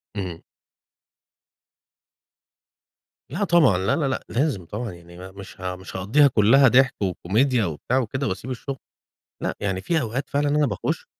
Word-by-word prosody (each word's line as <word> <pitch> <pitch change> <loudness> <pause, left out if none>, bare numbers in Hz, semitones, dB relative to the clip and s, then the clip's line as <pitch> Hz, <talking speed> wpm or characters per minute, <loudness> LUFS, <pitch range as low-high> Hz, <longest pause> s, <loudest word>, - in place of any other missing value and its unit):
إمم. 90 -5 -5 2.9
لأ، 180 +8 -2
طبعًا. 170 - +4
لا 95 +4 +1
لا 150 -5 0
لأ، 130 - -2
لازم 125 - -1
طبعًا، 110 +6 -5
يعني 85 0 -14
ما 95 +1 -10
مش 95 0 -12
ه 90 0 -3
مش 95 0 -11
هاقضّيها 120 +11 +4
كلها 130 +4 +5
ضِحك 130 0 +3
وكوميديا 110 +6 +1
وبتاع 85 - -2
وكده 130 +3 -2
واسيب 115 +7 -4
الشغل. 135 +2 -5 0.6
لأ، - - -2
يعني 95 -2 -2
في 160 - 0
أوقات 125 +3 -4
فعلًا 145 +1 0
أنا 150 0 +2
باخُش 100 -6 -3
115 Hz, 150 wpm, -23 LUFS, 95-135 Hz, 2.9 s, كلها